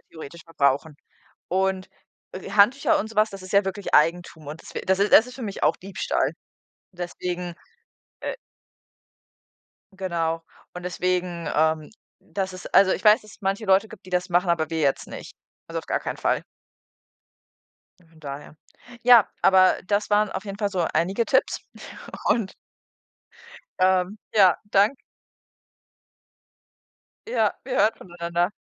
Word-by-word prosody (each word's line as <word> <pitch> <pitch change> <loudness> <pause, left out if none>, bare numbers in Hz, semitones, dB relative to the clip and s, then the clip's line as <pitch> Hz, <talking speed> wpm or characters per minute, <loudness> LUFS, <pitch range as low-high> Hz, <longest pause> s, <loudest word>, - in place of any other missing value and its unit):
theoretisch 160 0 -10
verbrauchen. 145 -1 0 0.5
Und, 190 0 0 0.4
äh, 185 - -8
Handtücher 225 +7 +4
und 220 - -3
so 225 - -14
was, 215 +1 +3
das 195 -1 -9
ist 185 - -9
ja 200 0 +4
wirklich 195 +1 -5
Eigentum 160 -1 +2
und 155 +3 -8
das - - -13
wä - - -4
das 190 0 +2
ist 205 - +2
das 220 - +8
ist 250 - -11
für 260 - -8
mich 200 -3 -6
auch 150 - +3
Diebstahl. 195 +1 -2 0.6
Deswegen, 175 0 -5 0.7
äh - - -4 1.6
Genau. 165 -4 -2 0.3
Und 180 - -7
deswegen 180 -1 -2
ähm, 155 0 +1 0.3
das 190 -2 -4
ist 185 - -10
also 190 -1 +6
ich - - -4
weiß, 215 +2 +6
dass 215 - -15
es - - -18
manche 195 +3 -1
Leute 195 +3 +4
gibt, 205 -4 -13
das 180 0 0
machen, 175 0 +2
aber 160 -2 0
wir 160 -1 -2
jetzt 140 -2 +1
nicht. - - -9 0.4
Also - - -3
auf - - -8
gar - - -1
keinen - - -4
Fall. - - 0 1.6
Von 165 -1 -23
daher. 145 +1 -8 0.5
Ja, 240 -4 +7
aber 185 -1 +5
das 205 +1 0
waren 210 0 +3
auf 190 - -5
jeden 200 0 -7
Fall 205 - 0
so 180 -4 -1
einige 190 +8 +1
Tipps 265 - +1 0.7
und 220 -5 +1 1.3
ähm, 185 +2 +2 0.2
ja, 190 -5 +6
dank 210 +7 +3 2.3
Ja, 470 - +1
wir - - -3
hören 220 - +3
voneinander. 175 0 -2
185 Hz, 150 wpm, -24 LUFS, 170-205 Hz, 2.3 s, das